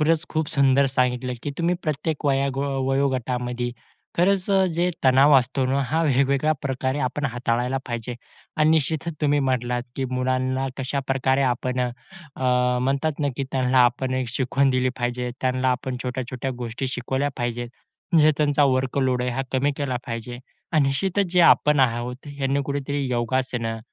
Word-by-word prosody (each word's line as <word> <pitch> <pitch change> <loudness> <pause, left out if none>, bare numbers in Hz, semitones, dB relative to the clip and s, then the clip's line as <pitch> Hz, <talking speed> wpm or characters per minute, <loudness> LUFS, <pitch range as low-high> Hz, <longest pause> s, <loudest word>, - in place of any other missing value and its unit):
खरंच 160 +1 +2
खूप 155 -1 -1
सुंदर 140 0 +3
सांगितलं, 125 -1 0
की 145 - -3
तुम्ही 170 +1 +1
प्रत्येक 155 0 -2
वयोगो 135 0 +1 0.3
वयोगटामध्ये 125 -2 -1 0.5
खरंच 190 +2 +2
अ, 195 -1 +4
जे 175 +2 +1
तणाव 135 +3 +6
असतो 130 +1 -1
ना, 135 +2 +1
हा 155 +6 0
वेगवेगळ्या 140 +1 +2
प्रकारे 130 +1 -2
आपण 145 +4 -4
हाताळायला 120 +2 0
पाहिजे. 120 0 -4 0.4
आणि 155 0 +4
निश्चितच 160 +1 0
तुम्ही 145 -1 +2
म्हणलात, 125 -1 -1
की 135 - -1
मुलांना 130 +1 0
कशाप्रकारे 135 0 0
आपण 125 +1 -2
अ, 125 -1 0 0.9
म्हणतात 140 +3 0
ना, 145 - +1
की 135 - -2
त्यांना 130 -1 +2
आपण 130 +2 0
एक 130 -1 -1
शिकवण 135 +3 +1
दिली 130 0 +1
पाहिजे. 125 0 -2
त्यांना 130 0 +1
आपण 125 0 -2
छोट्या-छोट्या 130 +1 -4
गोष्टी 120 +3 -4
शिकवल्या 130 +3 -1
पाहिजेत. 120 -1 -3 0.4
म्हणजे 155 -2 +6
त्यांचा 145 -1 +3
वर्कलोड 130 -1 +1
आहे, 125 - -1
हा 130 +2 -2
कमी 135 +2 +2
केला 135 -3 -2
पाहिजे. 120 +1 -5 0.3
आणि 155 -3 +4
निश्चितच 190 +7 0
जे 180 - +4
आपण 150 -3 +5
आहोत, 125 +2 -1
ह्यांनी 140 -1 -1
कुठेतरी 140 0 -2
योगासनं, 120 -2 -1
130 Hz, 155 wpm, -23 LUFS, 125-145 Hz, 0.9 s, तणाव